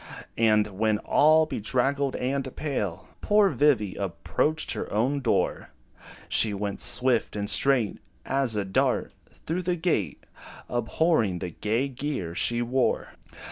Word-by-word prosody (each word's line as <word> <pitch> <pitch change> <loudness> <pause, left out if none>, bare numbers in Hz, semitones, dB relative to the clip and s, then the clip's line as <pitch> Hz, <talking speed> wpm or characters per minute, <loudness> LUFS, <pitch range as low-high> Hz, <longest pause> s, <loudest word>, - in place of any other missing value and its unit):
And 110 -2 +4
when, 105 +2 0
all 155 +7 +4
bedraggled 135 +2 -1
and 130 +1 -3
pale, 105 - -4
Poor 205 -2 +3
Vivy 130 -10 +2
approached 125 - -2
her - - -4
own 125 +7 0
door, 120 - -1 0.6
She 105 -2 +2
went, 100 0 -4
swift 125 -4 +4
and 105 -1 -3
straight 120 0 +2 0.3
As 135 -4 0
a 105 -1 -1
dart, 95 - 0 0.2
through 170 +3 -5
the 180 0 -1
gate, 170 0 -2 0.4
Abhorring 120 - 0
the 90 0 -5
gay 115 - -1
gear 130 - -4
she 120 +6 +1
wore. 125 +2 -1
125 Hz, 130 wpm, -26 LUFS, 105-145 Hz, 0.6 s, And